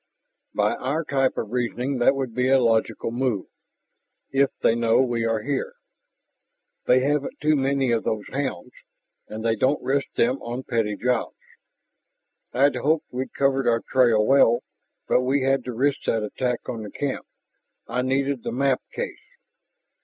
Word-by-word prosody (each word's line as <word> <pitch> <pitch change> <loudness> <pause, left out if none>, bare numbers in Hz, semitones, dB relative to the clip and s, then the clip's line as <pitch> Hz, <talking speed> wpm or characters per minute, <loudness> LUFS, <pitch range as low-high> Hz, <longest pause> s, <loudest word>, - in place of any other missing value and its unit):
"By - - +2
our 145 +6 -1
type 135 -3 0
of 105 - -3
reasoning, 125 +2 -1
that 120 +3 +4
would 130 -4 -3
be 125 +2 +1
a 135 - +6
logical 115 -1 +1
move 120 -5 -1 0.9
if 135 0 +3
they - - +5
know 115 -1 +2
we 120 -3 +1
are 115 -1 0
here. 140 0 -2 1.1
They 130 +1 +4
haven't 145 +1 -1
too 155 +1 +3
many 135 -2 +1
of 115 -1 +1
those 105 -2 -2
hounds, 140 0 -3 0.6
and 110 +1 -6
they 115 -1 +2
don't 130 +6 +1
risk 140 +1 0
them 125 +3 +1
on 120 +2 -5
petty 115 -5 -1
jobs. 125 +1 -1 1.1
I'd 135 0 +3
hoped 150 +5 +1
we'd 130 +1 -4
covered 135 -1 +1
our 115 -1 +2
trail 120 -5 +4
well. 120 -2 +4 0.4
But - - +3
we 130 +2 +1
had 135 -1 +2
to 125 - -3
risk 135 +4 0
that 110 -1 +1
attack 125 +3 -3
on 115 - -4
the 105 - -7
camp.... 140 +5 -4 0.6
I 125 - -1
needed 135 0 0
the - - -4
map 135 0 +1
case!" 485 - -5
130 Hz, 160 wpm, -24 LUFS, 115-135 Hz, 1.1 s, a